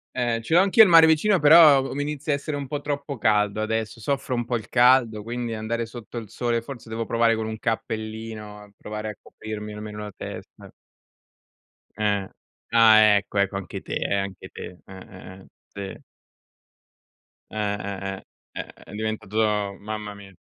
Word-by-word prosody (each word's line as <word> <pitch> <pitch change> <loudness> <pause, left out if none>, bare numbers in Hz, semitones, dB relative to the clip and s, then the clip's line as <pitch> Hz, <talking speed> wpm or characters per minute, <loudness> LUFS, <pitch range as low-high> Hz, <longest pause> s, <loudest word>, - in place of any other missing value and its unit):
Eh, 120 -2 0
ce 160 - -4
l'ho 180 - +7
anch'io 200 +3 +7
il 195 - +4
mare 165 -1 +9
vicino, 170 +6 +3
però 150 -1 +8
uo 135 - -5
mi 145 - -2
inizia 150 0 -2
a - - +3
essere 145 +1 -4
un 140 - -4
po' 145 +1 -4
troppo 145 -2 -4
caldo 105 -1 +1
adesso, 110 +1 -2
soffro 135 +2 -2
un 120 -1 -2
po' 120 - -1
il 110 -4 -4
caldo, 120 -3 +4
quindi 120 +1 -4
andare 115 +2 -3
sotto 120 +1 -10
il 110 -3 -6
sole 120 0 -1
forse 120 -2 -10
devo 115 0 -3
provare 115 0 +2
con 110 0 -3
un 110 0 -5
cappellino, 110 -2 -5
provare 105 0 -6
a 105 - -7
coprirmi 105 -1 -8
almeno 105 0 -7
la 105 -2 -7
testa. - - -9 1.2
Eh. 100 -2 0 0.5
Ah, 110 -2 +7 0.2
ecco, 100 0 -2
ecco 100 0 +1
anche 95 - -6
te, - - -7
eh 100 - -1
anche 100 -1 -4
te. 90 - -9
Eh, 95 -1 -11
eh, 95 0 -12
eh, - - -17 0.5
sì. - - -18 1.5
Eh, 110 - -8 0.2
eh, 95 0 -5
eh, - - -21 0.3
è - - -5 0.2
è - - -14
diventato 105 -1 -1
mamma 105 0 -6
mia. 100 -1 -13
110 Hz, 180 wpm, -24 LUFS, 105-125 Hz, 1.5 s, mare